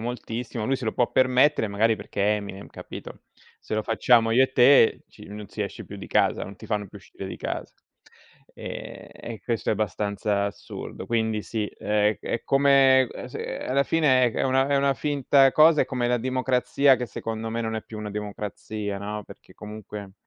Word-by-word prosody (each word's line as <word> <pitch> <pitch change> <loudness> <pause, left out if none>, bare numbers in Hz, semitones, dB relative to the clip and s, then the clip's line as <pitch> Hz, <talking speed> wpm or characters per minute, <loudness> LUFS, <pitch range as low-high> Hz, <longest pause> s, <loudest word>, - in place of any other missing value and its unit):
moltissimo, 120 -1 -4
lui 135 +4 +1
se 130 -3 -6
lo 110 - -1
può 120 - +1
permettere 130 -2 +3
magari 110 +3 +2
perché 100 - -5
è 105 0 +3
Eminem, 100 -1 -7
capito? - - -10 0.4
Se - - -5
lo 110 - 0
facciamo 115 +1 +3
io 130 +3 +5
e 130 - -7
te 125 -2 +5
ci - - -14
non 105 0 -8
si 105 - -9
esce 100 -2 -4
più - - -10
di - - -8
casa, - - +1
non 95 0 -7
ti - - -13
fanno 105 -2 -2
più 100 - -13
uscire 95 0 -10
di - - -6
casa. - - -5 0.8
Ehm, - - -8
e 115 -3 -9
questo 115 -3 -2
è - - +4
abbastanza 100 0 -1
assurdo. 100 - -8
Quindi 110 -2 -1
sì, 110 -1 -3
è 105 0 0
è 115 - -3
come 135 -1 +5
ehm, - - -8
s - - -14
alla 140 +2 -1
fine 130 -6 +3
è - - -2
una 135 0 +2
è 140 - +2
una 140 0 +2
finta 140 -1 +3
cosa, 155 0 +6
è - - -1
come 125 -2 -2
la 125 - +2
democrazia 130 +2 +2
che 125 - -3
secondo 110 0 -5
me 115 +1 -2
non 110 -1 -2
è 110 - -3
più 110 - -10
una 105 -1 -5
democrazia, 105 0 -5
no? 105 +1 -5
Perché - - -15
comunque, 105 -2 -9
115 Hz, 200 wpm, -25 LUFS, 105-130 Hz, 0.8 s, cosa